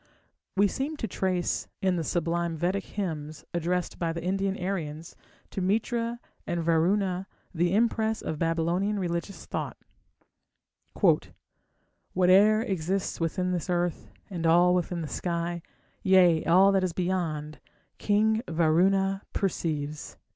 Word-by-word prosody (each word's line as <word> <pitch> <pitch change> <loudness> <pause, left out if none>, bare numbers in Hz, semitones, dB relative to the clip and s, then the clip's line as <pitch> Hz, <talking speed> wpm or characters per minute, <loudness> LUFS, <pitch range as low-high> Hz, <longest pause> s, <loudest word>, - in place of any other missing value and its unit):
We 200 +1 +5
seem 280 +8 -3
to 225 - -3
trace 185 -2 -1
in 185 -1 +1
the 170 - -1
sublime 170 0 -1
Vedic 185 +4 -1
hymns 155 -6 -5
addressed 175 +1 -1
by 170 -1 0
the 165 0 -5
Indian 195 +1 0
Aryans 165 -4 -4 0.4
to 195 - -3
Mitra 230 +4 0 0.3
and 170 -1 -1
Varuna 180 +3 +1 0.3
the 175 +2 +1
impress 220 -1 +1
of 155 - -4
Babylonian 170 +5 0
religious 170 -1 -3
thought: - - -4 2.4
Whate'er 195 +4 +5
exists 190 -1 -2
within 180 +2 -1
this 180 -1 -2
earth, 175 -1 -1 0.2
and 170 -5 -2
all 175 +2 +5
within 180 -1 -1
the - - -4
sky, 170 +1 -2 0.4
Yea, 180 -4 +5
all 190 +4 +6
that 195 -1 +2
is 180 -2 -1
beyond, 165 -5 -2 0.4
King 220 +2 +2
Varuna 190 +4 +2
perceives.... 155 -6 -2
180 Hz, 125 wpm, -27 LUFS, 165-195 Hz, 2.4 s, all